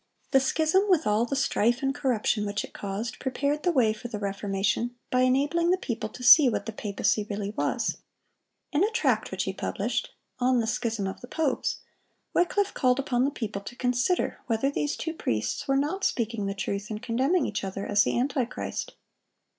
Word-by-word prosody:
The 270 Hz, -, +6 dB
schism, 320 Hz, +9 st, +2 dB
with 345 Hz, -4 st, +3 dB
all 210 Hz, +2 st, +2 dB
the 275 Hz, -, -2 dB
strife 245 Hz, -2 st, +1 dB
and 270 Hz, 0 st, +1 dB
corruption 240 Hz, -6 st, 0 dB
which 205 Hz, 0 st, -2 dB
it -, -, -10 dB
caused, 205 Hz, +4 st, -4 dB
prepared 280 Hz, +3 st, -1 dB
the 355 Hz, -, +2 dB
way 240 Hz, -8 st, +3 dB
for 220 Hz, -, -8 dB
the 230 Hz, -3 st, -5 dB
Reformation, 200 Hz, +4 st, -1 dB, 0.2 s
by 255 Hz, -, +2 dB
enabling 285 Hz, +7 st, +2 dB
the 365 Hz, -, +4 dB
people 235 Hz, -11 st, -4 dB
to 250 Hz, -, -10 dB
see 265 Hz, +2 st, +9 dB
what 220 Hz, -, -2 dB
the 225 Hz, -, -4 dB
papacy 210 Hz, 0 st, -1 dB
really 205 Hz, -1 st, -3 dB
was. -, -, -1 dB, 0.7 s
In 300 Hz, +5 st, +2 dB
a 420 Hz, -, +3 dB
tract 445 Hz, -, +1 dB
which -, -, -2 dB
he -, -, -3 dB
published, -, -, -2 dB, 0.3 s
"On 250 Hz, 0 st, +3 dB
the 230 Hz, -, 0 dB
Schism 220 Hz, -2 st, -1 dB
of 190 Hz, -, -5 dB
the 245 Hz, -, -9 dB
Popes," 295 Hz, -2 st, -1 dB, 0.5 s
Wycliffe 390 Hz, +3 st, +1 dB
called 250 Hz, -1 st, +2 dB
upon 255 Hz, -2 st, +1 dB
the -, -, +2 dB
people 215 Hz, -7 st, -4 dB
to 220 Hz, +4 st, -9 dB
consider 250 Hz, +8 st, 0 dB
whether 235 Hz, +4 st, +1 dB
these 290 Hz, +1 st, -1 dB
two 325 Hz, -, -3 dB
priests 110 Hz, -, -2 dB
were 270 Hz, 0 st, +3 dB
not 310 Hz, +8 st, -1 dB
speaking 230 Hz, -, 0 dB
the 195 Hz, -, -3 dB
truth 200 Hz, +1 st, -3 dB
in 215 Hz, -, -3 dB
condemning 260 Hz, +8 st, +1 dB
each 210 Hz, -1 st, -3 dB
other 195 Hz, +1 st, -4 dB
as 205 Hz, -1 st, +4 dB
the -, -, 0 dB
antichrist. 255 Hz, -1 st, -2 dB
245 Hz, 195 wpm, -27 LUFS, 210-280 Hz, 0.7 s, see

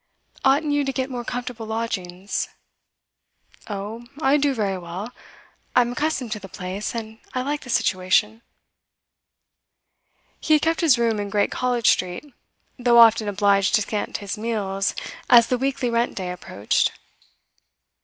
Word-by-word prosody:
'Oughtn't 290 Hz, +2 st, +3 dB
you 290 Hz, 0 st, +2 dB
to 270 Hz, -, -1 dB
get 260 Hz, 0 st, -3 dB
more 245 Hz, -1 st, -4 dB
comfortable 240 Hz, -2 st, -5 dB
lodgings?' 200 Hz, -4 st, -3 dB, 1.2 s
'Oh, 210 Hz, +4 st, -6 dB
I 285 Hz, -1 st, +4 dB
do 285 Hz, -1 st, +2 dB
very 195 Hz, -4 st, -1 dB
well. 180 Hz, +6 st, -6 dB, 0.6 s
I'm 245 Hz, -1 st, +4 dB
accustomed 285 Hz, -3 st, -2 dB
to 215 Hz, -, -2 dB
the 195 Hz, -1 st, -11 dB
place, 185 Hz, +6 st, -5 dB
and 220 Hz, -1 st, -6 dB, 0.2 s
I 255 Hz, -, 0 dB
like 290 Hz, +2 st, -2 dB
the 250 Hz, -, -11 dB
situation.' 210 Hz, +1 st, +1 dB, 2.0 s
He 310 Hz, -, +3 dB
had 300 Hz, -, +1 dB
kept 325 Hz, 0 st, +1 dB
his 305 Hz, -7 st, +5 dB
room 230 Hz, -2 st, +1 dB
in 205 Hz, 0 st, -3 dB
Great 205 Hz, 0 st, +1 dB
College 245 Hz, -2 st, 0 dB
Street, 185 Hz, +11 st, +1 dB, 0.5 s
though 240 Hz, -1 st, +4 dB
often 225 Hz, -2 st, +7 dB
obliged 200 Hz, -1 st, +3 dB
to 215 Hz, -, +2 dB
scant 210 Hz, 0 st, -3 dB
his 200 Hz, +2 st, -6 dB
meals 205 Hz, -3 st, -1 dB, 0.3 s
as 235 Hz, -2 st, +8 dB
the 250 Hz, +1 st, -1 dB
weekly 265 Hz, -2 st, -1 dB
rent 235 Hz, +1 st, 0 dB
day 185 Hz, -2 st, -3 dB
approached. 140 Hz, -, 0 dB
230 Hz, 145 wpm, -23 LUFS, 200-250 Hz, 2.0 s, as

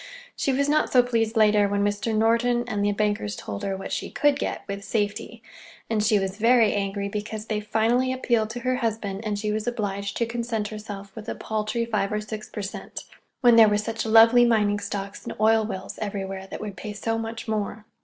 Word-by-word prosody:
She 275 Hz, -, 0 dB
was 280 Hz, +2 st, +1 dB
not 305 Hz, +1 st, +2 dB
so 250 Hz, -1 st, +6 dB
pleased 230 Hz, -2 st, 0 dB
later, 210 Hz, -1 st, +5 dB
when 200 Hz, 0 st, +1 dB
Mr. 205 Hz, +2 st, -1 dB
Norton 235 Hz, +2 st, +2 dB
and 210 Hz, -4 st, -1 dB
the 205 Hz, -, +2 dB
bankers 205 Hz, -, -1 dB
told 100 Hz, -1 st, -6 dB
her 195 Hz, -1 st, -2 dB
what 195 Hz, -, -7 dB
she -, -, -3 dB
could 290 Hz, -2 st, +2 dB
get—with 200 Hz, -5 st, -4 dB
safety; 215 Hz, +2 st, -3 dB, 0.5 s
and 215 Hz, -2 st, +1 dB
she 215 Hz, 0 st, +4 dB
was 195 Hz, 0 st, -2 dB
very 230 Hz, -1 st, +4 dB
angry 200 Hz, 0 st, -2 dB
because 210 Hz, +1 st, -5 dB
they 215 Hz, -1 st, -1 dB
finally 230 Hz, +4 st, +1 dB
appealed 235 Hz, -4 st, 0 dB
to 240 Hz, +2 st, -6 dB
her 255 Hz, +1 st, 0 dB
husband 220 Hz, -5 st, -2 dB
and 210 Hz, -2 st, -2 dB
she 210 Hz, +1 st, -2 dB
was 215 Hz, +1 st, -2 dB
obliged 200 Hz, -4 st, -2 dB
to 235 Hz, -, +1 dB
content 230 Hz, -2 st, -3 dB
herself 205 Hz, -2 st, -8 dB
with 220 Hz, 0 st, -7 dB
a -, -, -3 dB
paltry 220 Hz, +2 st, -2 dB
five 210 Hz, -4 st, -1 dB
or 210 Hz, -, 0 dB
six 215 Hz, 0 st, -7 dB
per 210 Hz, -, -5 dB
cent, 195 Hz, -, -6 dB, 0.4 s
when 240 Hz, -3 st, +6 dB
there 220 Hz, -2 st, +8 dB
were 205 Hz, -, +2 dB
such 220 Hz, +1 st, -3 dB
lovely 225 Hz, +2 st, +7 dB
mining 210 Hz, -3 st, +3 dB
stocks 200 Hz, 0 st, -5 dB
and -, -, -6 dB
oil 220 Hz, 0 st, +4 dB
wells 190 Hz, -3 st, -6 dB
everywhere 195 Hz, -2 st, -4 dB
that -, -, -7 dB
would 210 Hz, -2 st, -6 dB
pay 210 Hz, +3 st, -6 dB
so 225 Hz, +2 st, -2 dB
much 225 Hz, +1 st, -5 dB
more. 215 Hz, 0 st, -3 dB
215 Hz, 210 wpm, -25 LUFS, 205-230 Hz, 0.5 s, there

